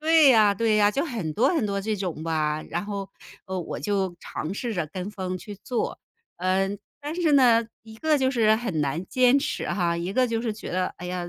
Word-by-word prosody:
对 315 -2 +6
呀 215 -5 +6
对 220 +1 +2
呀， 205 -1 +5
就 280 - 0
很 225 - -3
多 255 +5 +3
很 315 -11 +1
多 200 -1 -1
这 215 +2 -2
种 180 -5 -4
吧， 155 -1 -1
然 175 +3 -2
后， 200 -2 -5 0.4
呃， 190 0 -3
我 165 - -5
就 195 -4 -1
尝 160 +5 -5
试 235 +2 -3
着 175 -6 -2
跟 185 +5 -6
风 185 -3 -4
去 205 +3 -9
做。 245 - -2 0.4
嗯， 190 +2 0 0.2
但 295 +1 -5
是 320 -3 +3
呢， 240 -4 +5 0.2
一 220 0 -13
个 310 +5 +2
就 260 -2 +2
是 225 -4 +4
很 220 -8 -2
难 150 +5 -1
坚 255 +1 +4
持 280 - -2
哈， 175 -3 0
一 175 +3 -3
个 255 +3 +3
就 225 -1 -1
是 230 -2 -2
觉 210 - -8
得， 185 +1 0
哎 180 - -7
呀， 180 -1 -4
205 Hz, 240 characters per minute, -25 LUFS, 180-240 Hz, 0.4 s, 对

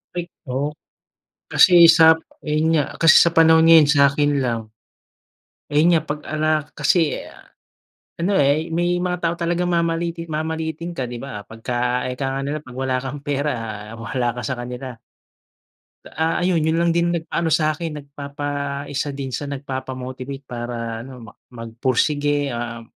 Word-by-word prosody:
Ay 175 - -1 0.2
oo. 135 +4 -2 0.8
Kasi 175 -2 +7
sa 160 -1 +7 0.3
ayun 155 +2 +1
nga, 145 - +2 0.2
kasi 165 -1 +7
sa 170 - +4
panahon 160 -1 +5
ngayon 165 -3 +7
sakin 145 0 +3
lang 115 -2 -1 1.1
ayun 150 +3 +3
nga, - - -1
pag-ala 155 +1 -2 0.3
kasi 155 +1 +2 1.0
ano 190 +4 0
eh, 145 +4 +2
may 175 +2 0
mga 180 -1 -1
tao 165 0 +1
talagang 175 +1 -1
mamaliitin 170 0 -1
mamaliitin 160 +2 -3
ka, 130 -5 -3
'di 120 -1 -6
ba. 105 -7 -7
Pagka, 125 +2 -2
ika 135 +1 -3
nga - - -2
nila, 150 +2 -2
"Pag 130 -2 -12
wala 130 -1 -1
kang 140 +2 -6
pera, 145 -1 -1 0.4
wala 120 +1 -2
ka 120 - -5
sa 130 - -1
kanila." 125 +1 -6 1.1
Ah, 160 +1 -1
ayun, 175 -4 +2
yun 160 +1 +1
lang 170 0 +2
din 170 0 +1
nag 170 -2 -2
ano 170 -1 0
sa'kin, 155 0 0
nagpapa 140 0 -8 0.4
isa 145 +1 -3
din 135 -2 -5
sa 145 +4 -4
nagpapa-motivate 130 0 -6
para 120 -2 -5
ano, 125 -2 -11
mak 105 - -15
magpursige, 130 +4 -1
um, 115 -1 -5
145 Hz, 150 wpm, -21 LUFS, 130-165 Hz, 1.1 s, Kasi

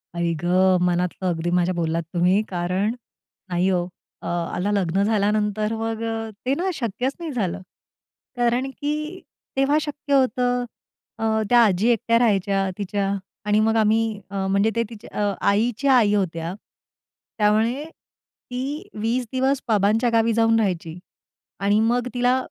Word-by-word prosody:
आई 170 -1 0
गं! 185 +1 +4
मनातलं 180 +1 0
अगदी 170 0 -1
माझ्या 180 +1 +2
बोललात 165 -1 -1
तुम्ही, 180 +4 +3
कारण 185 +4 -1 0.6
नाही 180 +2 +1
हो 180 -1 0 0.3
अ, - - -7
आला 175 +3 -2
लग्न 195 -1 +1
झाल्यानंतर 210 0 +1
मग 225 0 -3 0.5
ते 265 - +2
ना 375 +4 -1
शक्यच 245 0 -2
नाही 330 -3 -5
झालं. 190 -6 -2 0.8
कारण 245 +2 +1
की 290 +3 -3 0.6
तेव्हा 275 +2 +3
शक्य 290 -1 -4
होतं. 250 -1 +2 0.6
अ, - - -3 0.3
त्या 240 -1 +6
आजी 200 +2 +2
एकट्या 230 0 +2
राहायच्या 195 -3 +2
तिच्या 200 -1 -1 0.3
आणि 210 +1 +3
मग 220 +1 +2
आम्ही 220 0 +2
अ, 195 -1 -2
म्हणजे 200 +3 +2
ते 230 - +2
तिच्या 205 -2 -3 0.2
आईच्या 240 +6 +2
आई 215 -5 +4
होत्या. 170 -4 -1 0.8
त्यामुळे 220 +6 +2
ती 275 -3 -8
20 240 +3 0
दिवस 265 +1 +1
बाबांच्या 220 +3 +2
गावी 230 0 +3
जाऊन 225 0 +3
राहायची 175 -5 -2 0.6
आणि 205 +2 +2
मग 240 +2 +1
तिला 245 +1 +2
210 Hz, 140 wpm, -23 LUFS, 190-240 Hz, 0.8 s, त्या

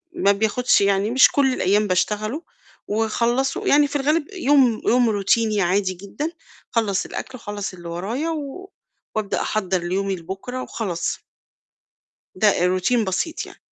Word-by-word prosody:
ما 200 - +3
بياخدش 220 +5 +2
يعني 200 +2 +2
مش 260 +2 +6
كلّ 270 -2 +2
الأيام 205 0 +2
باشتغله 215 - -1 0.4
واخلّصه، 240 - 0
يعني 290 -2 +5
في 285 - -8
الغالب 300 +3 +1
يوم 275 - +3
يوم 245 -1 +4
روتيني 215 +1 +1
عادي 190 +1 +1
جدًا، 200 - -5 0.4
أخلّص 205 -4 +1
الأكل - - -6
وأخلّص 205 -4 -5
اللي 175 -2 -9
ورايا 215 - -3
و 320 +5 -5 0.5
وأبدأ 215 -2 -1
أحضَّر 190 -4 0
ليومي 195 +2 -1
لبُكرة 195 +9 -6
وخلاص. 185 -7 -3 1.1
ده 205 +3 +4 0.3
Routine 225 +5 +1
بسيط 195 - -2
يعني. - - -14
215 Hz, 135 wpm, -22 LUFS, 195-265 Hz, 1.1 s, مش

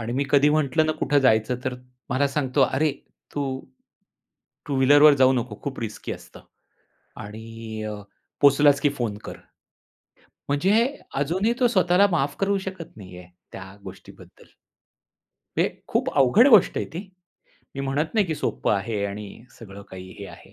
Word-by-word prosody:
आणि 115 +1 -4
मी 140 +2 0
कधी 145 +1 +5
म्हंटलं 155 +1 +1
ना 155 - +1
कुठं 145 - +2
जायचं 120 -1 +2
तर 130 -1 -2 0.4
मला 130 +3 +2
सांगतो, 135 -1 -1
"अरे 145 +3 +1 0.4
तू 135 -2 -3 1.1
टू 140 - -3
व्हीलरवर 145 +3 +6
जाऊ 130 0 +5
नको. 120 -4 -3
खूप 135 -3 -5
रिस्की 110 -2 -5
असतं - - -12 0.8
आणि 110 +1 -8
अ, 105 0 -4 0.5
पोहचलास 145 0 +5
की 145 - +3
फोन 110 -4 -2
कर." - - -7 1.1
म्हणजे 175 +9 +2 0.4
अजूनही 180 +11 0
तो 245 - +4
स्वतःला 185 -2 +3
माफ 140 -3 0
करू 200 0 +1
शकत 185 -7 -8
नाहीये 90 -3 -11 0.3
त्या 95 +1 -10
गोष्टीबद्दल. 95 0 -14 1.1
हे - - +4 0.2
खूप - - 0
अवघड 140 - +5
गोष्ट 215 -8 +5
आहे - - -2
ती. 165 - -8 0.8
मी 135 - -3
म्हणत 140 +5 -2
नाही 210 -3 +2
की 160 - -2
सोप्पं - - -1
आहे 100 0 -2
आणि 100 +1 -6 0.3
सगळं 100 -2 -11
काही 95 0 -10
हे 100 - -7
आहे. - - -14
135 Hz, 150 wpm, -24 LUFS, 110-155 Hz, 1.1 s, व्हीलरवर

